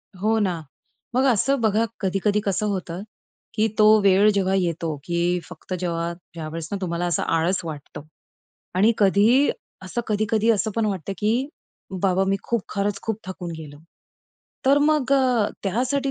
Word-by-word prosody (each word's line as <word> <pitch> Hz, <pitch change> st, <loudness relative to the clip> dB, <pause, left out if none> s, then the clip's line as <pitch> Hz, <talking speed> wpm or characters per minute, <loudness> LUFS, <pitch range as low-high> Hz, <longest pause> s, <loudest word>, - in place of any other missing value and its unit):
हो 215 Hz, +4 st, +1 dB
ना. 180 Hz, -5 st, 0 dB, 0.5 s
मग 260 Hz, -, +3 dB
असं 270 Hz, +5 st, +1 dB
बघा 220 Hz, +1 st, +2 dB, 0.2 s
कधी-कधी 195 Hz, +2 st, +1 dB
कसं 200 Hz, +2 st, 0 dB
होतं, 185 Hz, -2 st, -3 dB, 0.5 s
की 215 Hz, +1 st, +2 dB
तो 215 Hz, -, +6 dB, 0.2 s
वेळ 200 Hz, +2 st, +5 dB
जेव्हा 195 Hz, -1 st, +1 dB
येतो 165 Hz, -3 st, -1 dB
की 175 Hz, +1 st, 0 dB
फक्त 180 Hz, +2 st, -8 dB
जेव्हा 170 Hz, -1 st, -2 dB, 0.2 s
ज्यावेळेस 165 Hz, 0 st, -6 dB
ना 200 Hz, -, -1 dB
तुम्हाला 175 Hz, -1 st, -2 dB
असं 175 Hz, -3 st, 0 dB
आळस 165 Hz, +3 st, +1 dB
वाटतं 150 Hz, -2 st, -7 dB, 0.7 s
आणि 210 Hz, +5 st, +4 dB
कधीही 210 Hz, +7 st, +4 dB, 0.3 s
असं 185 Hz, +6 st, -3 dB
कधी-कधी 215 Hz, +1 st, +1 dB
असं 220 Hz, 0 st, +1 dB
पण 225 Hz, -1 st, +2 dB
वाटतं 195 Hz, -2 st, -3 dB
की 210 Hz, +1 st, +1 dB, 0.7 s
"बाबा 190 Hz, 0 st, +3 dB
मी 195 Hz, -, +2 dB
खूप 235 Hz, -4 st, -1 dB
खरंच 200 Hz, 0 st, -2 dB
खूप 220 Hz, -2 st, -2 dB
थकून 180 Hz, -2 st, -6 dB
गेलो!" 145 Hz, -2 st, -10 dB, 0.9 s
तर 280 Hz, +2 st, +6 dB
मग 290 Hz, -2 st, +2 dB
अ, 250 Hz, -6 st, +3 dB
त्यासाठी 255 Hz, +7 st, 0 dB
195 Hz, 155 wpm, -23 LUFS, 175-220 Hz, 0.9 s, तो